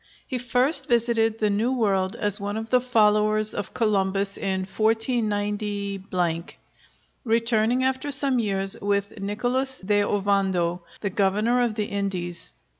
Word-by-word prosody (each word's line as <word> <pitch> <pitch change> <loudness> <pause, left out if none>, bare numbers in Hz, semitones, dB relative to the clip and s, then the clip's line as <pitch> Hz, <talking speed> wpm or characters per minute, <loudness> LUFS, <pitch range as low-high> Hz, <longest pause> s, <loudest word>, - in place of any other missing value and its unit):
He 255 -3 -4
first 250 +5 +2
visited 230 -2 +1
the 215 -2 0
New 225 +6 0
World 195 -6 0
as 205 -1 0
one 205 +1 -4
of 225 0 -6
the 250 -1 +4
followers 215 -3 +2
of 205 - -6
Columbus 200 -3 +1
in 190 -1 -2
149, 205 -5 -1 0.8
returning 230 +1 +1
after 265 +2 -1
some 270 -2 +4
years 195 -3 +1
with 200 +1 -2
Nicholas 245 +7 0
de 205 +2 +1
Ovando, 195 -4 0 0.2
the 200 - -2
governor 210 +6 +1
of 235 -3 0
the 210 -1 -1
Indies. 190 - -3
210 Hz, 130 wpm, -24 LUFS, 195-235 Hz, 0.8 s, the